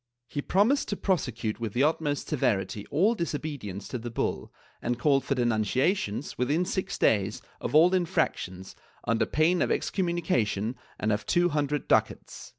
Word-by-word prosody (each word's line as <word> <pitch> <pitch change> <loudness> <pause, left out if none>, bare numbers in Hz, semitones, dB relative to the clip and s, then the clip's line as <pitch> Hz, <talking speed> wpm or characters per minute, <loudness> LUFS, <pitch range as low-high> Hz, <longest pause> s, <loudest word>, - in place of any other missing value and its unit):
He 145 - -3
promised 215 - +2
to 205 - -2
prosecute 125 - -1
with 115 -3 -3
the 125 - +2
utmost 150 -1 0
severity 105 -8 -1
all 200 +8 +3
disobedience 145 - -4
to 125 - -3
the 120 +1 -5
bull, 115 - -2 0.3
and 120 0 -1
called 135 0 +3
for 140 - -1
denunciations, 120 - 0
within 145 +8 +1
six 190 0 -2
days, 105 0 +2 0.2
of - - -3
all 170 +4 +6
infractions, 95 - -1 0.3
under 115 +1 +1
pain 170 +3 +2
of - - +2
excommunication 130 - 0 0.2
and 110 - 0
of 105 +1 -2
two 175 0 +3
hundred 150 -2 -1
ducats. - - 0
140 Hz, 155 wpm, -28 LUFS, 110-170 Hz, 0.3 s, all